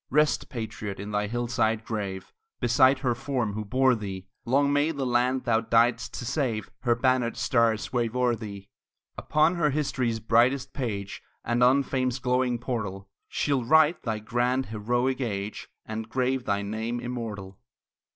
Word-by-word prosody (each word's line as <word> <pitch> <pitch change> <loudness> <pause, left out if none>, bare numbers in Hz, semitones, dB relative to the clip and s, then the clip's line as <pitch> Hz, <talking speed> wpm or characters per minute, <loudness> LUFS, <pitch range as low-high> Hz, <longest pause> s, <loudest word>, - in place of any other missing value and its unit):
Rest, 150 +1 +2
patriot, 110 -4 -5
in 100 +1 -6
thy 105 0 0
hillside 115 -1 0
grave, 100 -4 -4 0.3
Beside 130 +3 +4
her 120 - +3
form 120 -4 -2
who 110 +1 -3
bore 130 +5 +3
thee! 95 -4 -5 0.2
Long 140 +4 +2
may 145 +2 +3
the 140 -4 -2
land 125 +1 +1
thou 115 -1 +2
diedst 115 +1 +2
to 120 - -5
save 125 -5 -2
Her 120 -2 +2
bannered 125 -1 +1
stars 115 -2 +1
wave 120 -1 0
o'er 125 -1 +2
thee! 100 -3 -8 0.5
Upon 155 +4 +2
her 155 -3 +3
history's 130 -5 -1
brightest 125 +4 +2
page, 100 -7 -4 0.2
And 120 +1 +2
on 135 +3 +5
fame's 130 -1 -1
glowing 125 -1 +1
portal, 100 -6 -4 0.2
She'll 140 -4 0
write 160 +6 +4
thy 110 -3 -2
grand, 125 +4 0
heroic 120 +5 -1
age, 105 -3 -4 0.2
And 110 0 -5
grave 130 0 0
thy 100 0 0
name 110 +4 -3
immortal. 110 -6 -6
120 Hz, 155 wpm, -27 LUFS, 110-130 Hz, 0.5 s, on